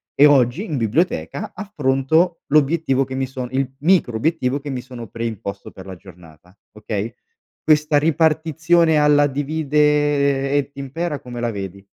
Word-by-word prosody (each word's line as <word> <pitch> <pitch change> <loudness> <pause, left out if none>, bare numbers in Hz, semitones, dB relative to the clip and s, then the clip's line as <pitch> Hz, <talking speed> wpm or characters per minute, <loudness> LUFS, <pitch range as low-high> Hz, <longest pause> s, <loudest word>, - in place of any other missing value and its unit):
e 145 - +6
oggi 140 - +3
in 155 -8 -3
biblioteca 160 - -1
affronto 160 -2 0
l'obiettivo 145 -2 +2
che 130 0 -7
mi 135 0 -1
son 130 -1 -6
il 130 0 -1
micro 155 -6 +2
obiettivo 140 0 0
che 145 +1 -8
mi 130 -2 -4
sono 120 -2 -10
preimposto 110 -4 -6
per 95 - -12
la 95 -1 -8
giornata. 90 -1 -17 0.2
Okay? 105 +1 -4 0.5
Questa 150 -1 +3
ripartizione 160 +1 +2
alla 145 -1 +4
divide 145 -1 +1
et 145 -1 0
impera 145 +3 -4
come 120 -1 -8
la 120 0 -1
vedi? 100 -2 -7
140 Hz, 145 wpm, -20 LUFS, 120-155 Hz, 0.5 s, e